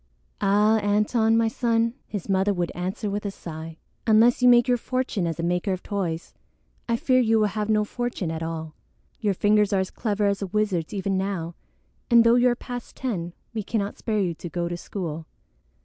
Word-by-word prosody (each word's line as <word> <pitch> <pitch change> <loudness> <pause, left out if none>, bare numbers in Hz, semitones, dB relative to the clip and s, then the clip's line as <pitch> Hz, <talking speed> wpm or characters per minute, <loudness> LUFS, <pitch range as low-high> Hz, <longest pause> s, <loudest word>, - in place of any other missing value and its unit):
"Ah, 210 +2 +4
Antone, 215 +2 +2
my 230 0 +3
son," 230 0 +1
his 205 -4 -5
mother 195 +1 +2
would 175 -1 -1
answer 185 +4 -3
with 205 +1 -2
a 205 - -2
sigh, 160 -3 -8 0.3
"unless 230 +3 +5
you 250 - +7
make 240 0 +6
your 250 - +4
fortune 245 -7 -2
as 165 0 -4
a - - -2
maker 180 +3 0
of 185 - -5
toys, 180 -5 -3 0.6
I 230 - +3
fear 255 +2 +3
you 225 -2 +3
will 215 - +3
have 210 +1 -3
no 215 -1 +3
fortune 240 -7 -3
at 160 0 -4
all. 160 -1 -4 0.5
Your 205 -3 0
fingers 210 +1 +3
are 195 - +2
as 190 - -2
clever 210 -2 -1
as 200 -1 +1
a 200 - -2
wizard's 195 -5 -1
even 195 -1 -1
now; 185 -4 -3 0.6
and 235 -1 +7
though 230 0 +5
you 245 +1 +5
are 240 - +1
past 245 0 -8
ten, 180 -10 -3 0.2
we 220 - -2
cannot 205 0 -3
spare 215 -2 -1
you 180 -4 0
to 170 +2 -8
go 170 +1 -2
to 175 - -3
school." 165 -3 -5
205 Hz, 205 wpm, -25 LUFS, 180-225 Hz, 0.6 s, you